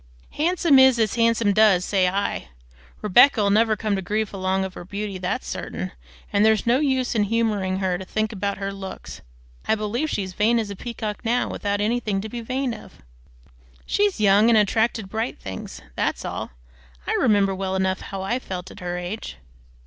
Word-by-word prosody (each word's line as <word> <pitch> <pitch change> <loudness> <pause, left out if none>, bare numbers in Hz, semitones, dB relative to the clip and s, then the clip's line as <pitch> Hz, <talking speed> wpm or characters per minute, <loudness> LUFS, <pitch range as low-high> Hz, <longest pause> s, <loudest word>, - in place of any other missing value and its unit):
"'Handsome 330 -3 +3
is 265 -2 +6
as 220 -2 +1
handsome 230 -3 +2
does,' 200 -4 +4
say 190 -2 +2
I. 200 +2 -2 0.6
Rebecca 215 +1 +5
never'll 215 +1 +3
come 210 -1 -1
to 190 - -2
grief 210 +3 -2
along 190 0 0
of 190 - -7
her - - -8
beauty, 200 +1 -5
that's 180 0 -3
certain, 90 +4 -5 0.4
and 205 - +4
there's 220 -1 +3
no 240 +3 +3
use 265 -4 +1
in 215 -3 +2
humoring 205 -4 0
her 185 -2 -1
to - - -6
think 215 +3 -1
about 200 0 -2
her 195 0 -4
looks. 195 -1 -8 0.5
I - - +3
believe 225 +8 -2
she's 190 -6 -3
vain 225 +5 +2
as 215 -3 -2
a - - -5
peacock 215 0 -5
now, 240 +2 +1
without 205 0 -2
anything 215 -2 0
to 220 - -6
be 235 +2 -5
vain 255 +1 -2
of." - - -13 0.8
"She's 405 - +1
young 205 +2 +5
and 230 - +5
attracted 220 +2 +2
to - - -11
bright 220 +4 -3
things 95 -1 -8
that's - - -1
all. - - -4 0.6
I - - -1
remember 205 -5 +3
well 190 0 -3
enough 190 -1 0
how 195 -1 -6
I 235 +6 -1
felt 185 -6 -7
at - - -12
her 175 0 -4
age." 180 - -6
210 Hz, 190 wpm, -23 LUFS, 190-230 Hz, 0.8 s, is